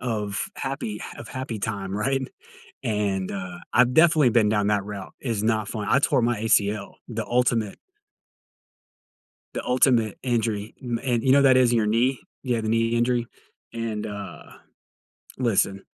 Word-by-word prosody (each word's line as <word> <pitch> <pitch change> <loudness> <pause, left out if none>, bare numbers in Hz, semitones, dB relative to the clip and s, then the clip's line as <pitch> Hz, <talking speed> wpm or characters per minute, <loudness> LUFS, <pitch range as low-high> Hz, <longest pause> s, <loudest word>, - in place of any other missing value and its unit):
of 105 -5 -2
happy 135 -6 -4
ha - - -9
of 115 - -9
happy 125 -5 -5
time. 100 -2 -3
Right? 135 +5 0 0.6
And, 100 -3 -1
uh, 95 -3 -6
I've 125 +1 +4
definitely 155 -6 +5
been 110 -2 +3
down 105 -1 +1
that 100 -1 +1
route 100 -2 -7
is 115 -5 -2
not 110 -2 +1
fun. 105 -2 -4
I 140 - +4
tore 135 - +2
my 120 -2 0
ACL, 105 -2 +1
the 115 -2 -4
ultimate 120 -4 +1 1.8
the - - -4
ultimate 125 -4 +2
injury. 110 -4 -1
M 120 -2 -2
and 120 -3 0
you 130 - +3
know 140 +1 +6
that 130 -2 +6
is 125 -2 +4
in 120 - +3
your 110 - +2
knee? 120 +4 +1 0.2
Yeah, 120 -3 0
the 110 - -2
knee 115 0 +2
injury. 120 0 +1 0.5
And, 110 -2 -3
uh, 100 -1 -7 0.9
listen, 100 -5 +1
115 Hz, 160 wpm, -24 LUFS, 105-125 Hz, 1.8 s, know